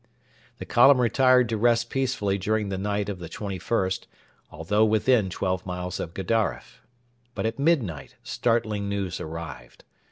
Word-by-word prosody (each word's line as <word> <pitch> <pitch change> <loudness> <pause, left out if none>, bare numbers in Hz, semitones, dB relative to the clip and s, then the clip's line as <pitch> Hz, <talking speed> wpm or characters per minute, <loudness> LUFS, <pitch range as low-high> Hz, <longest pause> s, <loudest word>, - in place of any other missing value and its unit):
The - - -7
column 135 +2 +6
retired 125 +1 +4
to 110 - -1
rest 115 +1 +2
peacefully 125 -7 -1
during 105 +1 -1
the 95 - -3
night 105 0 -1
of 100 -3 -5
the 85 -2 -8
21st, 95 0 -2 0.4
although 105 +7 0
within 110 -1 +3
twelve 95 0 -2
miles 90 0 -5
of 85 - -6
Gedaref. 110 +3 -2 0.5
But - - -2
at 115 - -2
midnight 120 - 0
startling 110 -4 -1
news 100 -3 -3
arrived. 80 -7 -8
105 Hz, 140 wpm, -25 LUFS, 95-115 Hz, 0.5 s, column